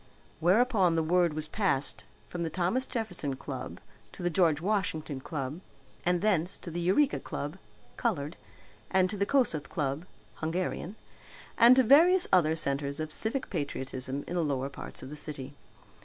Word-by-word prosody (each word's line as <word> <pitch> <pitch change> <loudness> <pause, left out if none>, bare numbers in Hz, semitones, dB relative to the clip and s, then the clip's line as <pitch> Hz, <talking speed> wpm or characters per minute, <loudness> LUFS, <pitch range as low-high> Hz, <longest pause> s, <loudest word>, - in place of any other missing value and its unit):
Whereupon 190 0 +4
the 165 - +2
word 170 -1 +2
was 155 0 -3
passed 155 -7 -1 0.2
from 175 - -5
the 165 - -1
Thomas 185 - 0
Jefferson 180 - -3
Club - - -6 0.3
to - - -8
the 175 - +1
George 165 -4 +3
Washington 160 -7 -1
Club 140 +3 -5 0.4
and 175 -1 +2
thence 190 -3 +2
to 170 - -8
the 170 - -3
Eureka 195 +12 +3
Club 145 +6 -5 0.4
(coloured), 165 - -1 0.5
and 185 0 +3
to - - -3
the 200 0 0
Kossuth 245 - +1
Club 150 0 -2 0.3
(Hungarian), 175 +4 -2 0.6
and 240 +2 +8
to 260 - +5
various 335 +9 +6
other 160 -4 +5
centres 140 -2 -1
of 155 0 -3
civic 240 +5 -2
patriotism 135 -4 -3
in - - -6
the 175 - +1
lower 135 -2 -1
parts 140 - -8
of 130 - -8
the - - -6
city. 145 -2 -7
170 Hz, 160 wpm, -30 LUFS, 150-200 Hz, 0.6 s, and